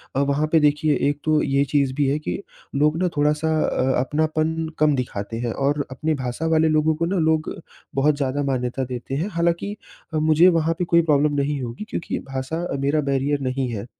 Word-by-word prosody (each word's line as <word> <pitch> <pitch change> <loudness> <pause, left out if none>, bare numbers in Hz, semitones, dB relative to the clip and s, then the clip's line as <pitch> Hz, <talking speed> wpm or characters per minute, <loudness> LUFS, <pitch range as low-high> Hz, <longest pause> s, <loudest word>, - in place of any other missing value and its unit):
अ, - - +2
वहाँ 140 +2 +1
पे 160 - +5
देखिए 150 0 +2
1 145 0 -3
तो 155 -1 +2
ये 140 0 +2
चीज़ 140 -1 +1
भी 145 -1 +1
है 145 - +1
कि 155 - -4 0.3
लोग 150 +3 +2
ना 185 - +3
थोड़ा-सा 150 +2 +1 0.2
अ, 130 0 +1
अपनापन 155 +3 0 0.2
कम 150 -1 +4
दिखाते 115 -3 -4
हैं। 120 -1 -2
और 145 +1 0
अपनी 155 +5 -1
भाषा 130 +3 -4
वाले 160 0 +3
लोगों 155 0 +2
को 165 +2 -1
ना 190 +2 -1
लोग 160 -1 +1 0.4
बहुत 145 +2 +3
ज़्यादा 140 0 -1
मान्यता 130 -1 -1
देते 125 +1 -5
हैं। 170 +9 -1
हालाँकि 170 +4 0 0.4
अ, 155 - 0
मुझे 155 +3 +5
वहाँ 165 -1 +2
पे 180 - 0
कोई 170 0 +4
प्रॉब्लम 150 -2 +2
नहीं 140 0 -1
होगी 120 - -5
क्योंकि - - -3
भाषा 135 +5 -3
अ, 140 - -3
मेरा 140 +2 +1
बैरियर 140 +1 0
नहीं 130 0 -1
है। 105 -1 -5
145 Hz, 205 wpm, -22 LUFS, 135-155 Hz, 0.4 s, पे